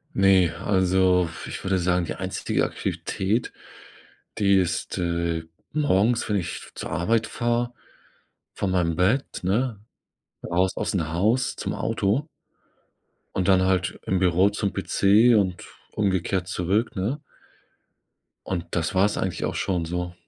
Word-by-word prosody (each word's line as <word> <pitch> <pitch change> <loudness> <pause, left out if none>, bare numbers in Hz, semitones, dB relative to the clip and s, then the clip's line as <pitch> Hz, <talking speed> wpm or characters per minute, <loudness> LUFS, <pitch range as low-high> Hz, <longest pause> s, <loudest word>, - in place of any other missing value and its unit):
Ne, 95 -3 +5
also, 95 -2 +2 0.2
ich - - -7
würde 95 0 +1
sagen, 90 -1 +1
die - - -4
einstige - - -1
Aktivität, 105 +5 -2 0.9
die 100 -1 +4
ist, 90 +1 -1
äh, 85 -2 -1 0.3
morgens, 120 -6 +2
wenn 105 - +2
ich 85 - -5
zur - - -5
Arbeit 110 +7 +1
fahre, 120 +1 -1 0.8
von 95 -2 -1
meinem 85 -3 +1
Bett, 105 +11 +1
ne, 110 +3 0 0.7
raus 90 +2 +2
aus 105 - -2
'n 80 -3 -1
Haus 110 +8 +1
zum - - -3
Auto 120 +11 0 1.1
und 95 0 0
dann 95 -1 +5
halt 95 -1 0
im 95 -1 +1
Büro 90 +2 +4
zum 100 -1 -2
PC 110 +4 +4
und 95 -3 0 0.3
umgekehrt 95 -2 0
zurück, 100 +7 0
ne? 110 +11 -2 1.3
Und 85 -3 -2
das 85 +2 -1
war's 100 +2 +3
eigentlich 95 -2 -2
auch - - -3
schon 90 -3 -1
so. 90 +1 -3
95 Hz, 135 wpm, -25 LUFS, 90-105 Hz, 1.3 s, Ne